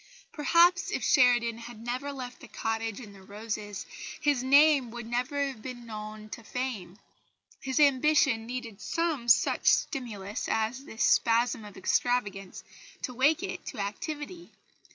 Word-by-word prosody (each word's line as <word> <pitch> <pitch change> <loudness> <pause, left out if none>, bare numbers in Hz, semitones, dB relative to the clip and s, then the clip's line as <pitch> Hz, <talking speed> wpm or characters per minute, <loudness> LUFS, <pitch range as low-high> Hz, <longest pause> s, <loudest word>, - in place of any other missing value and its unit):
Perhaps 350 +6 +4
if - - -2
Sheridan 240 -4 +4
had 235 -1 -10
never 250 +5 -4
left 255 -3 -7
the - - -12
cottage 225 0 -3
and 210 -5 -11
the 195 - -15
roses, 205 0 -6 0.3
his 290 -4 +2
name 280 0 +5
would 240 0 -7
never 250 +5 -1
have 265 -5 -6
been 245 0 -8
known 215 -1 -8
to 230 - -8
fame. 220 -7 -5 0.6
His 265 +1 -1
ambition 280 -4 +3
needed 235 -4 -6
some 320 -8 -1
such 245 +1 +3
stimulus 215 - 0
as 225 +5 -1
this 220 - -3
spasm 230 -1 +3
of 205 -2 -11
extravagance 200 -6 -1 0.4
to 250 - -3
wake 290 +8 +3
it - - -5
to - - -6
activity. 295 - -5
245 Hz, 145 wpm, -29 LUFS, 220-275 Hz, 0.6 s, name